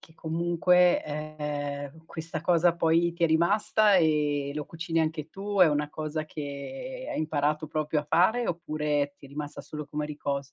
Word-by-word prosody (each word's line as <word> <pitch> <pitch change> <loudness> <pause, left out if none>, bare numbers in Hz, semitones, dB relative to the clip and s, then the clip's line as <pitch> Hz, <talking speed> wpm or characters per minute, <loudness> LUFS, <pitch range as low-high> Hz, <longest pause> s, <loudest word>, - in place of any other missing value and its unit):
che 160 - -18
comunque, 175 +2 +3
ehm, 150 0 -5
questa 160 -1 -5
cosa 170 +1 +3
poi 170 0 +2
ti 170 +1 -6
è - - +7
rimasta 205 +5 +3
e 150 -4 +2
lo 150 0 -4
cucini 165 0 -3
anche 155 -1 -1
tu, 200 +1 -4
è 180 - +8
una 150 0 0
cosa 155 0 -4
che 155 - -6
hai - - -3
imparato 150 0 0
proprio 155 0 0
a - - -11
fare, 220 +10 +3
oppure 150 -4 -1
ti 140 - -14
è - - -16
rimasta 145 0 -6
solo 150 +2 -7
come 150 0 -3
ricos 140 -2 -4
155 Hz, 170 wpm, -28 LUFS, 150-170 Hz, -, è